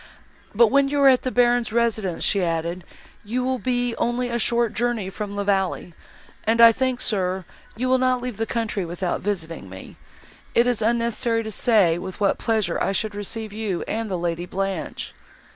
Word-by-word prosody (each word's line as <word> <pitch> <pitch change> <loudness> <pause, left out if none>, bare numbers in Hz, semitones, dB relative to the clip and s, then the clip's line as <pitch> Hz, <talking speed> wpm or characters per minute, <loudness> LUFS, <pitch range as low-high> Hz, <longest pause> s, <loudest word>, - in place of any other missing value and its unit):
"But, 230 +1 +6
when 275 0 +4
you 290 0 0
are 275 - +7
at 255 -1 +4
the 255 - -2
Baron's 245 -2 +2
residence," 220 -6 0
she 200 - +2
added, 170 +1 -2 0.4
"you 240 +4 -2
will 260 0 -1
be 245 -1 -1
only 245 +1 0
a 235 0 -1
short 235 0 +2
journey 230 -5 -1
from 205 0 -5
La 205 - -1
Vallée, 195 -3 -1 0.5
and 225 +1 +1
I 230 0 +10
think, 255 +1 -1
sir, 185 -5 -1 0.3
you 250 +4 -2
will 260 0 +3
not 255 0 +2
leave 245 -4 -5
the 225 0 -2
country 225 -4 -2
without 175 +1 -3
visiting 165 - -4
me; 95 0 -11 0.6
it 235 - +5
is 245 -3 0
unnecessary 230 0 +1
to 220 - -6
say 200 -8 +3
with 190 0 -7
what 200 -2 +1
pleasure 215 -6 0
I - - +1
should 215 +1 -2
receive 210 +1 -4
you 210 -5 -3
and 225 0 -3
the 185 - -1
Lady 170 0 -3
Blanche." 195 -2 -4
220 Hz, 190 wpm, -23 LUFS, 190-240 Hz, 0.6 s, I